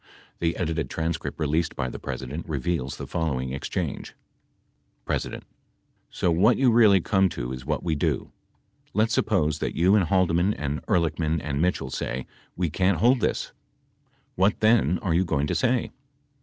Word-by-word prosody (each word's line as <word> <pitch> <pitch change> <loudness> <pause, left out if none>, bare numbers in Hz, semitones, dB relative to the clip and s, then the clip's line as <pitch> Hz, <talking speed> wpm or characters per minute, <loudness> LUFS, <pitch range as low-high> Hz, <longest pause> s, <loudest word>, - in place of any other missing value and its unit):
63 85 - 0
The 85 - -1
edited 80 -5 -2
transcript 80 0 -3
released 80 +2 0
by 65 - -2
the - - -7
President 75 +7 -6
reveals 75 -2 -2
the - - -6
following 65 -6 -2
exchange: 70 - -4 0.9
P. - - +1 0.9
So 90 - 0
what 105 +8 +4
you 130 -3 +4
really 110 -5 +6
come 95 +1 +2
to 60 -5 -5
is 65 +1 -8
what 75 -1 -1
we 85 - 0
do. 70 - -1 0.6
Let's 110 +2 +2
suppose 80 -8 +1
that - - -3
you 90 +4 +4
and 100 -4 +3
Haldeman 95 +1 +2
and 75 -1 -3
Ehrlichman 80 -1 +1
and 70 0 -2
Mitchell 85 -7 0
say 65 0 -3 0.3
we 85 -3 -1
can't 95 +2 +2
hold 120 +9 +4
this? - - -1 0.8
What 95 +3 +2
then 110 -7 +3
are 90 -5 +1
you 90 +3 +3
going 70 -5 0
to - - -1
say 125 -1 +1
85 Hz, 165 wpm, -25 LUFS, 75-95 Hz, 0.9 s, really